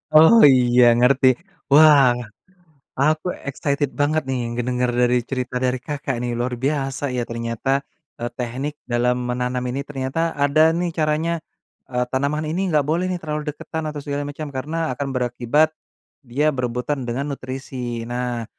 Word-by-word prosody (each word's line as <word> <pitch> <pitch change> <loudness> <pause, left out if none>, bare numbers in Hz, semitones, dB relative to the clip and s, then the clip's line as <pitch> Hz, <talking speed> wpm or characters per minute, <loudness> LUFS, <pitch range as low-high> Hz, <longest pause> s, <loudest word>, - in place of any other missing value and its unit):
Oh 160 +8 +8 0.2
iya 125 -1 +4
ngerti. 130 +2 +4 0.4
Wah, 145 -4 +7 0.9
aku 155 +4 +2 0.2
excited 140 +1 -1
banget 155 +2 +2
nih 130 -1 -1
ngedenger 125 +1 -1
dari 125 0 +3
cerita 125 -1 -3
dari 130 0 +1
Kakak 145 -3 -3
nih, 120 - -2
luar 125 +1 -1
biasa 135 -1 -1
ya 125 - 0
ternyata. 115 +2 -3 0.5
Eee, 120 - -2
tehnik 130 +5 -4 0.2
dalam 125 +1 +2
menanam 125 +1 -2
ini 135 +3 -3
ternyata 150 +4 -2
ada 145 +3 +4
nih 175 0 -1
caranya, 160 +1 0 0.5
eee, 125 -1 0
"Tanaman 140 +3 0
ini 180 +5 -1
enggak 150 -4 +2
boleh 170 +5 0
nih 185 - -1
terlalu 150 0 -3
deketan 155 +1 -5
atau 150 -2 -6
segala 145 0 -3
macam, 145 +1 -6
karena 155 +3 -2
akan 140 +2 -4
berakibat, 125 +5 +1 0.5
dia 145 +4 0
berebutan 125 +1 -3
dengan 140 +5 -2
nutrisi." 130 -3 -5
Nah, 120 0 -3
135 Hz, 150 wpm, -22 LUFS, 125-150 Hz, 0.9 s, Oh